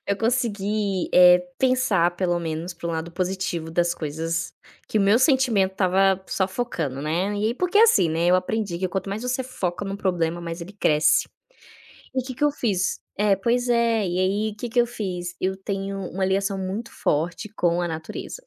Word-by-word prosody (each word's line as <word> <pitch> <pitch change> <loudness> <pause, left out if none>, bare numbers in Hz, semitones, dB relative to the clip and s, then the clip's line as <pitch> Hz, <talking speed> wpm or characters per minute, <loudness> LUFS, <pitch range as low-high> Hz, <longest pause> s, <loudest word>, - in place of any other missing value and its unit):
eu 200 - 0
consegui, 210 -5 0
eh, 180 0 +8 0.2
pensar 255 -9 +3
pelo 175 -2 0
menos 165 +1 -4
para 170 0 -6
um - - -2
lado 160 +1 -4
positivo 180 -2 -3
das 170 +1 +1
coisas 165 +2 -3 0.3
que 215 - 0
o - - +2
meu 200 +4 +4
sentimento 255 -8 +3
estava 190 0 +2
só 190 - 0
focando, 165 - -3
né, 175 +7 -1
e 210 - 0
aí 230 - 0
porque 360 +6 +1
assim, 230 - +5
né, 165 +2 0
eu 180 +1 +5
aprendi 195 -1 -2
que 185 +1 -1
quanto 190 +2 -3
mais 210 +4 -4
você 250 +1 -1
foca 200 -8 -4
no 195 0 -4
problema, 175 -3 -1
mais 170 0 -6
ele 175 +4 -8
cresce. 155 -6 +3 0.9
E 260 - 0
que 260 0 -6
que 275 +4 -1
eu 295 - +4
fiz? 205 -10 -1 0.2
É, 205 -1 +3
pois 240 +5 0
é, 230 -3 +2
e 180 0 -2
aí 205 +3 0
que 240 +3 -5
que 240 +2 +2
eu 240 - +3
fiz? 180 -7 -5
Eu 190 +1 -1
tenho 195 0 -4
uma 190 +1 -1
ligação 195 +1 0
muito 195 +5 -4
forte 170 +7 -1
com 175 -2 +1
a 175 - 0
natureza, 160 - -6
190 Hz, 195 wpm, -24 LUFS, 175-220 Hz, 0.9 s, eh